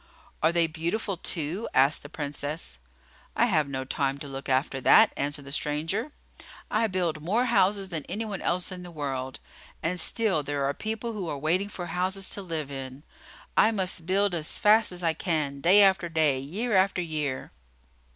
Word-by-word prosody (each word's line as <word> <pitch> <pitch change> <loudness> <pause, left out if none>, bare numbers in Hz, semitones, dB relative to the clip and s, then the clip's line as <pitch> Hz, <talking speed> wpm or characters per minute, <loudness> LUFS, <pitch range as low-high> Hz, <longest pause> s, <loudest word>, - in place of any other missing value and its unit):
"Are 160 - +4
they 170 -1 +3
beautiful, 170 +6 -2
too?" 170 +4 -2
asked 140 +3 +4
the 145 - -10
Princess. 145 - -5 0.6
"I 235 - +4
have 160 - +2
no 130 -1 -3
time 135 +1 -1
to 145 - -8
look 135 0 -6
after 135 0 +1
that," - - +6
answered 145 0 -3
the 140 - -9
stranger. 160 - -1 0.6
"I 225 +1 +2
build 175 -6 -1
more 215 +10 +1
houses 200 -4 +2
than 160 -5 -4
any 210 +6 -4
one 200 -3 -5
else 180 +2 0
in 180 -1 -7
the 180 - -9
world; 135 -5 -4 0.4
and 180 +3 -1
still, 200 -2 +1
there 145 0 -2
are 140 - 0
people 220 +6 -4
who 190 -6 -4
are 145 - -3
waiting 175 +8 0
for 180 -3 -6
houses 185 +2 -2
to 200 - -3
live 160 -6 -4
in. 135 +1 -7 0.5
I - - +6
must 185 -6 -1
build 200 +1 +2
as 160 -2 0
fast 215 0 +5
as 180 0 -4
I 165 -1 +2
can, 155 -5 -2
day 190 +6 +7
after 190 -3 +3
day, 155 -5 +2
year 200 - -2
after 190 -1 +3
year." 150 -5 -3
165 Hz, 185 wpm, -27 LUFS, 145-195 Hz, 0.6 s, day